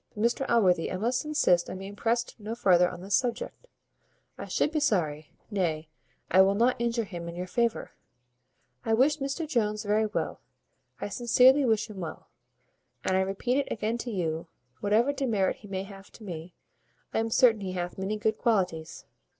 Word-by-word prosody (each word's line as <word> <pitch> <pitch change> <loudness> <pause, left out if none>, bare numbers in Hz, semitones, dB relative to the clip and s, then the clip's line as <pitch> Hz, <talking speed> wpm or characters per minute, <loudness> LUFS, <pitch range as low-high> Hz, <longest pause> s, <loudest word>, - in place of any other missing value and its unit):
Mr 235 +5 +1
Allworthy, 185 -8 +3
I 185 - -2
must 240 +8 -1
insist 180 - +2
on - - -5
being 195 +2 -8
pressed 235 +2 0
no 215 +2 -5
farther 180 -6 +4
on 180 -1 -9
this 195 +2 -4
subject. 255 - -1 0.7
I - - -7
should 300 - 0
be 315 - 0
sorry 160 - 0 0.2
nay, 165 -6 -1 0.4
I 190 - +7
will 195 +1 +4
not 235 +3 +2
injure 235 0 0
him 175 -5 -7
in 170 - -8
your 180 +1 -4
favour. 235 +4 -1 0.9
I 225 - +2
wish 280 +6 +3
Mr 275 +4 -3
Jones 215 -6 0
very 215 +1 +2
well. 210 - -3 0.6
I - - -4
sincerely 250 +5 +5
wish 220 -3 +1
him 210 -3 -9
well; 170 -3 -7 0.7
and 185 - +1
I 190 - +3
repeat 195 +7 -1
it 280 - -3
again 225 +2 -2
to 245 - -4
you, 165 -5 -2 0.3
whatever 225 +7 +2
demerit 230 -9 0
he 210 - -13
may 190 -1 -3
have 195 0 -12
to 225 - -13
me, 175 -3 -7 0.6
I - - +1
am 225 0 0
certain 225 -2 +4
he 185 -2 -4
hath 180 0 -4
many 200 +3 -2
good 215 +1 0
qualities. 180 -8 -1
210 Hz, 185 wpm, -28 LUFS, 185-235 Hz, 0.9 s, I